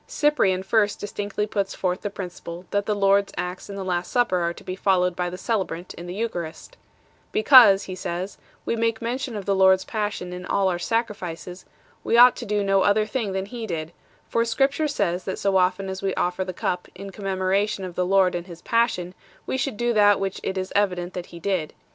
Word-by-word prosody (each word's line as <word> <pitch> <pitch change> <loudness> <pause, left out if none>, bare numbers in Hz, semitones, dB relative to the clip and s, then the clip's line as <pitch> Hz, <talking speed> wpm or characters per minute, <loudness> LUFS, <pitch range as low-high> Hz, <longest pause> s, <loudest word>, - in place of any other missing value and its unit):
Cyprian 195 -11 +2
first 205 +1 +1
distinctly 205 0 -3
puts 200 -2 -2
forth 180 -1 -1
the 205 - -3
principle 180 -2 -8
that 205 0 0
the 210 - +1
Lord 200 0 +4
s - - -14
acts 180 +2 -4
in 200 - -6
the 195 -1 -5
Last 175 -1 -2
Supper 240 -7 +2
are 170 0 0
to - - -12
be 185 - -5
followed 180 -2 +2
by 180 0 -1
the 180 - -7
celebrant 185 -5 -3
in 175 - -9
the 175 - -6
Eucharist. 195 - -5 0.3
" - - -35 0.2
Because," 255 - +7
he 185 - -6
says 185 +1 -5
9, - - -32
" - - -36
we - - 0
make 230 -1 0
mention 245 +1 -3
of 200 -2 -5
the 200 - +2
Lord 190 0 +6
s 190 - -8
Passion 205 -4 -3
in 180 0 -7
all 195 +1 +1
our 175 -1 -2
sacrifices... 185 -4 -3 0.4
we 230 - +2
ought 245 +1 +8
to 240 - -6
do 205 0 0
no 195 -1 +3
other 205 +2 +3
thing 215 -3 -2
than 190 0 -2
He 230 +1 -6
did; 160 -3 -4 0.4
for 230 - +1
Scripture 270 +6 +1
says 190 -10 -1
that 190 - -3
so 195 -1 0
often 185 +1 +1
as 190 0 -5
we 195 -1 -1
offer 180 +1 0
the 185 - -5
Cup 180 0 -3
in 195 +1 -8
commemoration 195 +1 -1
of 180 - -7
the 180 - 0
Lord 190 0 +3
and 175 +1 -4
His 170 -2 -11
Passion, 230 -7 +1 0.3
we - - -2
should 265 -4 -2
do 240 +1 +1
that 205 -2 +5
which 195 -1 -3
it 190 - -3
is 185 0 -3
evident 185 -3 0
that 180 -1 -6
He 170 - -11
did." 180 -4 -2
195 Hz, 230 wpm, -24 LUFS, 180-210 Hz, 0.4 s, ought